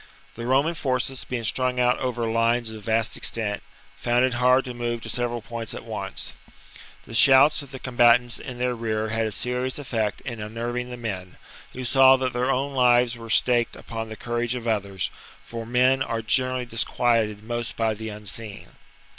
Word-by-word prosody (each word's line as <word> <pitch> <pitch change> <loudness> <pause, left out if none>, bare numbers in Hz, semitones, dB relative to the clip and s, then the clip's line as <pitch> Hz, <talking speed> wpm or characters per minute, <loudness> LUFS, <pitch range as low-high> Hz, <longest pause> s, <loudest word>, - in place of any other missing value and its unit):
The 115 +1 -6
Roman 140 +6 +2
forces, 130 -3 -1
being 125 -2 -4
strung 125 +2 +1
out 125 0 +2
over 120 -2 -2
lines 115 +1 +1
of 110 -2 -10
vast 115 0 +1
extent, 105 -3 -1 0.4
found 120 -1 +2
it 130 - -1
hard 125 +2 +3
to 125 - -5
move 120 -1 -3
to 115 - -7
several 120 -1 -1
points 115 -1 -4
at - - -8
once. - - -5 0.7
The - - -11
shouts 135 +5 +7
of 140 - -11
the 135 - -7
combatants 120 -1 +3
in 125 -3 -8
their 125 0 0
rear 110 -2 -2
had 115 0 0
a - - -4
serious 125 +5 -2
effect 115 -7 -2
in 120 -3 -6
unnerving 120 +3 -4
the 125 - -7
men, 95 -6 -6 0.4
who 130 - -6
saw 130 +1 +6
that 130 -1 -2
their 125 +2 0
own 135 +2 0
o - - -9
lives 120 -1 +4
were 115 -1 -10
staked 120 +1 +2
upon 115 -1 -6
the 110 - -7
courage 120 +1 -2
of 120 -1 -5
others; 100 -4 -1 0.3
for 115 -1 -7
men 130 +2 +3
are 115 -3 -2
generally 130 +2 +1
disquieted 115 -3 0
most 120 0 -4
by 115 -1 0
the 110 +1 -6
unseen. 105 0 -6
120 Hz, 190 wpm, -24 LUFS, 115-125 Hz, 0.7 s, shouts